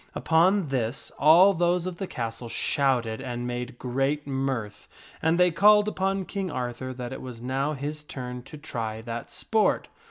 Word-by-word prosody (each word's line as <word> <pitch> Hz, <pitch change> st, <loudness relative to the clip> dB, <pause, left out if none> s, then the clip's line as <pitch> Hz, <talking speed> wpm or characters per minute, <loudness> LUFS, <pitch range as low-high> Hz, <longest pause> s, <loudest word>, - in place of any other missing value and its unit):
Upon 175 Hz, +1 st, +3 dB
this 130 Hz, +1 st, -2 dB
all 170 Hz, +7 st, +7 dB
those 175 Hz, 0 st, +1 dB
of 185 Hz, -2 st, -4 dB
the 195 Hz, -, -4 dB
castle 115 Hz, -2 st, -5 dB
shouted 125 Hz, -5 st, +1 dB
and 120 Hz, -2 st, -4 dB
made 125 Hz, 0 st, -4 dB
great 135 Hz, +4 st, -1 dB
mirth, 135 Hz, -6 st, -3 dB, 0.3 s
and 160 Hz, +2 st, +2 dB
they 180 Hz, 0 st, +5 dB
called 210 Hz, +4 st, +6 dB
upon 195 Hz, -2 st, -1 dB
King 195 Hz, -1 st, -3 dB
Arthur 125 Hz, -2 st, -4 dB
that 125 Hz, 0 st, -6 dB
it -, -, -7 dB
was 125 Hz, -3 st, -8 dB
now 135 Hz, +5 st, -1 dB
his 150 Hz, +2 st, -4 dB
turn 125 Hz, -4 st, -6 dB
to 135 Hz, +4 st, -11 dB
try 110 Hz, -7 st, -5 dB
that 115 Hz, 0 st, -5 dB
sport. 220 Hz, -1 st, +1 dB
135 Hz, 165 wpm, -26 LUFS, 120-170 Hz, 0.3 s, all